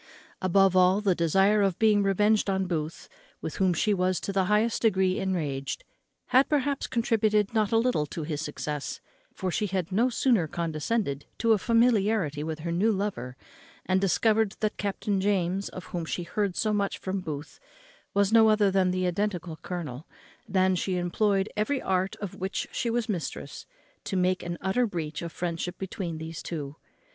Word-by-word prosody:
Above 190 0 +4
all, 185 +2 +5
the 200 -3 +2
desire 195 +5 +3
of 195 -3 +1
being 215 -2 +4
revenged 205 +2 +2
on 190 0 +1
Booth, 160 -3 -4 0.3
with 160 - -5
whom 190 -2 +3
she 205 +5 +1
was 185 -2 +1
to 195 - -4
the 190 -1 +2
highest 210 +4 +2
degree 190 -4 +2
enraged, 145 -8 -2 0.5
had, 260 +2 +4
perhaps, 285 -1 0
contributed 220 -3 +1
not 215 -3 +1
a 225 - +4
little 225 -11 +1
to 160 - -5
his 150 -1 -3
success; 150 -1 -4 0.3
for 185 -1 -3
she 210 - 0
had 185 -2 -2
no 230 +7 +3
sooner 235 -8 +2
condescended 160 -1 -2
to 230 -1 +3
a 215 - +2
familiarity 215 - +2
with 160 0 -4
her 170 +1 -3
new 195 +7 +2
lover, 190 - -3 0.5
and 185 0 +2
discovered 215 +2 +2
that 215 -1 -1
Captain 200 0 -1
James, 195 -1 0
of 185 - -8
whom 175 -2 -2
she 175 +2 -3
had 170 - -14
heard 200 -4 0
so 215 -1 +1
much 200 -1 0
from 190 +1 -3
Booth, 150 -3 -7 0.6
was 200 +1 +3
no 225 -1 +7
other 210 -2 +4
than 190 -1 +3
the 185 0 0
identical 180 -2 -2
colonel, 155 -7 -6 0.4
than 185 -1 +3
she 185 +1 -1
employed 195 +3 +1
every 260 +7 0
art 190 -2 0
of 200 -3 -6
which 190 +2 -3
she 235 - -1
was 230 0 0
mistress 190 -7 -5 0.4
to 195 - -2
make 185 0 +1
an 175 0 -4
utter 235 +6 +1
breach 155 -6 -4
of 170 -1 -5
friendship 175 +1 -3
between 185 -3 -4
these 160 +1 -6
two. 150 -4 -5
190 Hz, 180 wpm, -27 LUFS, 170-210 Hz, 0.6 s, no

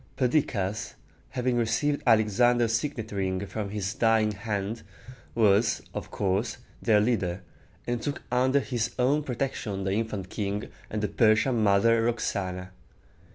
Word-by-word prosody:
Perdiccas, 105 -7 0 0.3
having 125 -1 0
received 120 +6 +1
Alexander's 115 +1 +4
signet 115 -3 -2
ring 95 -1 -1
from 105 0 -4
his 100 0 -3
dying 115 -3 +3
hand, 105 +1 -3 0.5
was, 110 0 +3
of - - -5
course, 100 +6 -1 0.2
their 110 -3 +4
leader, 95 -5 0 0.4
and 120 -1 -2
took 140 +4 -4
under 130 +3 +3
his 120 -3 -2
own 135 +4 +3
protection 120 -7 -3
the 95 - -1
infant 105 -3 -2
king 105 0 -3 0.2
and 105 0 -3
the - - +2
Persian 115 +3 +3
mother 110 +3 +4
Roxana. 95 -5 -2
110 Hz, 130 wpm, -27 LUFS, 100-120 Hz, 0.5 s, Alexander's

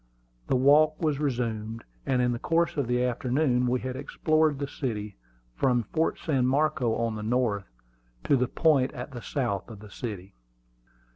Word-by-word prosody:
The - - +2
walk 150 +4 +5
was 155 -4 0
resumed, 115 -5 -2 0.2
and 125 -2 +2
in 125 - +2
the 120 - -3
course 170 +4 +1
of 140 -5 -1
the 125 +1 +1
forenoon 125 -1 +1
we 125 0 0
had 130 0 -4
explored 155 +2 +1
the 140 0 -3
city, 105 -8 -4 0.4
from 120 - +2
Fort 160 0 +1
San 135 -6 0
Marco, 135 -4 +1
on 115 -1 -1
the 105 - -5
north, 110 - 0 0.5
to - - +3
the 125 -1 +1
point 140 -4 +2
at 125 +1 -7
the 120 -2 -7
south 115 -10 -2
of 110 -3 -10
the 105 -1 -13
city. 100 -5 -6
125 Hz, 170 wpm, -27 LUFS, 115-145 Hz, 0.5 s, walk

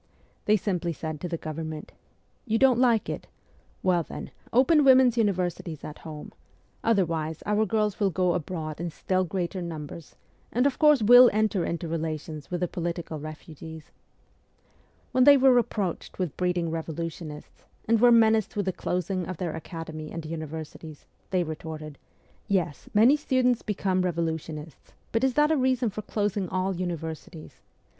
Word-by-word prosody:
They 215 +1 +4
simply 180 -4 -2
said 155 -1 -6
to 180 - -3
the 170 - -2
Government, 155 0 -6 0.3
' - - -41
You 225 0 +2
don't 255 -1 +4
like 235 -4 +3
it? - - -5 0.6
"Well, 180 -2 +3
then, - - -8 0.2
open 280 +5 +5
women's 260 -3 +6
universities 180 - -1
at 150 - -8
home; 155 -2 -9 0.5
otherwise 165 -7 0
our 210 +1 +2
girls 210 -1 0
will 200 -2 +3
go 180 0 +1
abroad 160 -2 -4
in 175 - -2
still 185 +3 0
greater 180 +1 -3
numbers, 160 -2 -7 0.4
and 250 +3 +2
of 280 -2 +1
course 300 -6 +5
will 245 +3 +9
enter 215 -3 +1
into 170 0 -3
relations 155 -2 -4
with 175 -1 -3
the 180 - +1
political 170 -2 -4
refugees.' 155 +1 -9 1.2
When 255 - +4
they 285 +1 +8
were 265 -1 +6
reproached 210 -7 -1
with 180 -6 -2
breeding 180 -2 0
revolutionists, 160 -1 -6 0.2
and 225 0 +3
were 245 0 +7
menaced 220 -1 +4
with 205 -2 -1
the 190 - -1
closing 180 0 -2
of 185 - -5
their 170 -3 -3
academy 160 -1 -7
and 165 -1 -6
universities, 155 -1 -7 0.2
they 185 -2 +1
retorted, 155 -2 -7 0.3
' - - -35
Yes, 145 -4 -10
many 235 +7 +7
students 255 -4 +1
become 190 -3 0
revolutionists; 160 -3 -4 0.2
but 225 - 0
is 265 -2 +2
that 300 +1 +4
a - - +4
reason 255 -3 +1
for 215 - -5
closing 205 -3 -2
all 185 +1 -1
universities 160 -4 -6
180 Hz, 160 wpm, -27 LUFS, 160-220 Hz, 1.2 s, will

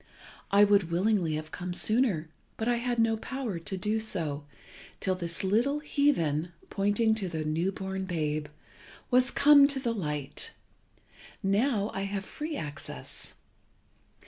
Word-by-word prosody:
I 200 +1 +6
would 200 -4 +4
willingly 180 -2 +1
have 155 0 -5
come 180 0 -4
sooner, 215 -8 +2 0.3
but 220 - -2
I 240 -1 +2
had 240 0 -1
no 225 -1 +3
power 235 -6 -4
to 190 +4 -3
do 210 +4 0
so, 160 -9 -2 0.5
till 190 - +1
this 170 -1 -3
little 235 +9 +2
heathen 180 - +1 0.2
(pointing 205 +3 +2
to 205 -4 -2
the 160 -2 -3
new 165 +5 0
born 190 0 -4
babe) 155 -4 -2 0.6
was 250 +1 +4
come 285 -1 +7
to 280 -1 +1
the 240 -3 -1
light. 150 -9 -3 0.9
Now 205 +2 +1
I 195 - -2
have 195 -1 -3
free 305 +7 -5
access. 145 -2 -7
195 Hz, 145 wpm, -29 LUFS, 170-230 Hz, 0.9 s, come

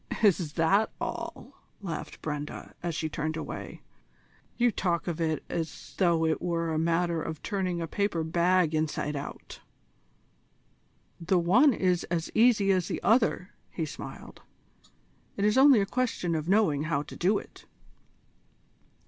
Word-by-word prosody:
"Is 180 -7 +3
that 195 +7 +3
all?" - - -5 0.3
laughed 170 -6 -6
Brenda, 150 -1 -5
as 170 -2 -3
she 160 - -1
turned 155 +1 -3
away. - - -7 0.7
"You 240 0 +3
talk 175 -4 -1
of 170 -1 -3
it 160 -1 -1
as 165 -2 -5
though 170 -3 +3
it 160 -1 0
were 165 -2 -1
a 155 - 0
matter 170 0 +1
of 160 -1 -6
turning 185 -3 -2
a 165 - -2
paper 200 -1 -1
bag 170 0 +2
inside 155 -1 -1
out." 140 - -7 1.6
"The 180 +2 +1
one 210 - +5
is 185 -5 +1
as 165 -1 -3
easy 220 -4 +4
as 185 -2 +1
the - - -3
other," 220 -4 +2 0.2
he 165 - -3
smiled. 150 - -9 1.0
"It 200 - +1
is 210 - +3
only 265 -4 +7
a - - +1
question 230 -7 -1
of 160 +1 -2
knowing 185 -8 +3
how 145 -3 0
to 150 - -11
do 195 +4 +2
it." - - -11
170 Hz, 150 wpm, -28 LUFS, 160-195 Hz, 1.6 s, only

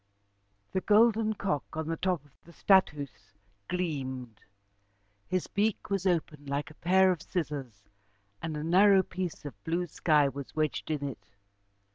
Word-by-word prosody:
The 190 - 0
golden 220 +1 +4
cock 150 -10 -1
on 160 -1 -2
the 165 - -1
top 180 -3 -1
of 145 - -23
the 170 - -16
'Stadhuis' 145 - +1 0.3
gleamed. 130 - -3 0.9
His 185 -1 -1
beak 210 0 -1
was 195 -1 +1
open 155 -5 -1
like 140 +1 -2
a 155 - -20
pair 190 +2 +5
of 175 -4 -3
scissors 135 - -4 0.5
and 160 -2 -3
a 150 - -4
narrow 190 +3 +5
piece 180 -4 -5
of 105 -9 -9
blue 170 +2 -1
sky 150 -3 +3
was 140 0 -7
wedged 155 0 -1
in 145 -2 -1
it. 135 - -9
160 Hz, 150 wpm, -30 LUFS, 145-185 Hz, 0.9 s, pair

